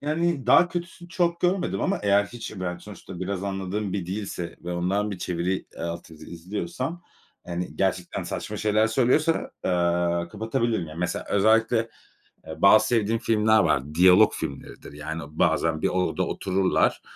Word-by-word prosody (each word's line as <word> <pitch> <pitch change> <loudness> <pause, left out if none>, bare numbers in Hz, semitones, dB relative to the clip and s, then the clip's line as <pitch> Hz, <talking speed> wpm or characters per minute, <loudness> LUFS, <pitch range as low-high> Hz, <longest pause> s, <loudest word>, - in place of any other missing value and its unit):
Yani 155 -1 -1
daha 175 - +6
kötüsünü 175 0 -6
çok 170 -2 0
görmedim 180 +1 0
ama 195 - 0
eğer 100 0 +4
hiç 120 +2 -8
ben 90 -1 -3
sonuçta 95 -2 -10
biraz 95 0 -3
anladığım 95 +1 -3
bir 95 -4 -3
dilse 95 -3 -5
ve 90 - -3
ondan 95 +4 0
bir 95 - -5
çeviri, 90 +1 -2
eee, - - -10
alt 85 0 -5
yazı 80 - -12
izliyorsam, 105 - -5 0.4
hani, 90 0 -5
gerçekten 95 -2 -1
saçma - - -5
şeyler 110 +1 +2
söylüyorsa, 130 +8 +1
eee, 85 -1 +1
kapatabilirim. 110 -1 -1
Yani 75 +2 -9
mesela 90 0 -2
özellikle 110 +3 +3 0.7
e 80 - -8
bazı 110 +2 +6
sevdiğim 115 -1 +1
filmler 110 0 +3
var. 70 +4 +1
Diyalog 95 +5 +6
filmleridir. 70 -2 -7
Yani, 80 +2 -5
o 70 - -11
bazen 80 0 +1
bir - - +2
odada 90 0 0
otururlar. 95 0 +1
95 Hz, 155 wpm, -25 LUFS, 85-115 Hz, 0.7 s, daha